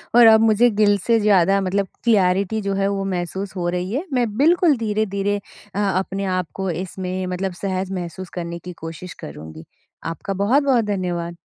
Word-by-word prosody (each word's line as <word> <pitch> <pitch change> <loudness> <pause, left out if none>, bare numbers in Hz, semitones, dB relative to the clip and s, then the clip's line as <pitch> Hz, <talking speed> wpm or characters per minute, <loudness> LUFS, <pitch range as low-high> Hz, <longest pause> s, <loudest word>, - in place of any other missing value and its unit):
और 240 -1 +8
अब 220 0 +8
मुझे 225 +2 +4
दिल 205 -1 +5
से 230 -1 +4
ज़्यादा 195 -2 +4
मतलब 195 +1 0 0.2
क्लैरिटी 200 -1 +2
जो 200 -1 -2
है 195 - +2
वो 200 -1 -1
महसूस 190 +3 -4
हो 175 -1 -2
रही 180 +2 -3
है 300 +8 -2
मैं 245 -2 +2
बिल्कुल 330 +1 +4
धीरे-धीरे 205 -2 -1 0.4
अ, 205 - -1
अपने 195 0 -1
आप 180 -2 -1
को 190 -1 -3
इसमें 185 +2 -4
मतलब 185 +1 -3
सहज 190 -1 -2
महसूस 180 0 -5
करने 170 0 -4
की 180 +1 -9
कोशिश 165 +2 -7
करूँगी, 80 +2 -9 0.4
आपका 165 +4 -4
बहुत-बहुत 260 0 +3
धन्यवाद। 175 -4 -2
195 Hz, 170 wpm, -21 LUFS, 180-210 Hz, 0.4 s, और